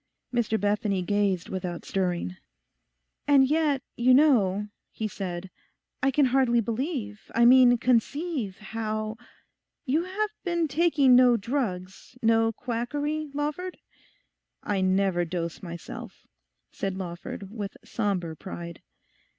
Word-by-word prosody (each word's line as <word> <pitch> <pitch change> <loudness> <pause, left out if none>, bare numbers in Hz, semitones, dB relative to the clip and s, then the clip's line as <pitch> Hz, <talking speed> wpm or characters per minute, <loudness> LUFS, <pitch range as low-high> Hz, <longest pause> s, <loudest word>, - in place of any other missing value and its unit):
Mr 225 -2 +1
Bethany 205 -2 0
gazed 200 -2 0
without 180 -2 -5
stirring. 180 -1 -1 0.9
'And 275 -2 +6
yet, 295 -3 +1
you 255 +1 +5
know,' 210 -9 +4 0.2
he 220 - -4
said, 185 -2 -5 0.5
'I 275 - +3
can 275 +1 +3
hardly 255 -2 +3
believe, 230 -2 -3
I 235 +1 +5
mean 245 0 +7
conceive, 250 - 0
how—You 225 - -5
have 415 +3 -2
been 345 -3 0
taking 290 -3 +4
no 245 -1 +6
drugs, 200 -3 -4
no 225 0 +4
quackery, 290 +7 -3
Lawford?' 300 +5 -3 0.9
'I 200 -2 0
never 185 -1 +2
dose 170 -1 -4
myself,' 170 -2 -9 0.5
said 195 -1 -3
Lawford, 185 +2 -6
with 210 -3 -6
sombre 185 -7 -2
pride. 170 -2 -8
225 Hz, 110 wpm, -27 LUFS, 190-270 Hz, 0.9 s, mean